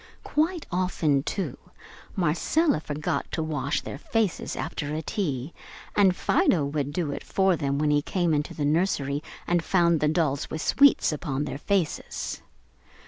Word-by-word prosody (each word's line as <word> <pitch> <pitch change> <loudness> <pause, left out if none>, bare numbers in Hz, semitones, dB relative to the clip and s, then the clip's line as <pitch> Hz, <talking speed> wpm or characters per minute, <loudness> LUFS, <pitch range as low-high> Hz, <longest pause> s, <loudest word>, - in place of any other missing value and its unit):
Quite 320 +2 0
often, 175 -6 +1
too, 165 -1 -3 0.6
Marcella 185 - +2
forgot 150 -1 -3
to 160 - 0
wash 155 -4 -1
their 140 - -7
faces 220 0 -1
after 155 -2 -3
a 160 - -3
"tea," 150 - -2 0.4
and 195 -3 +5
Fido 160 -4 +2
would 145 0 -2
do 160 -2 -1
it - - -5
for 190 -2 +2
them 140 -3 -1
when 150 0 +2
he 145 0 +3
came 175 +1 0
into 150 0 -1
the 145 - -1
nursery 145 -3 +1 0.2
and 175 -1 +1
found 170 -2 +3
the 150 - +2
dolls 150 -3 0
with 155 - -4
sweets 280 -9 +5
upon 145 -2 -2
their 140 - -5
faces. 190 -3 -2
155 Hz, 155 wpm, -26 LUFS, 145-185 Hz, 0.6 s, and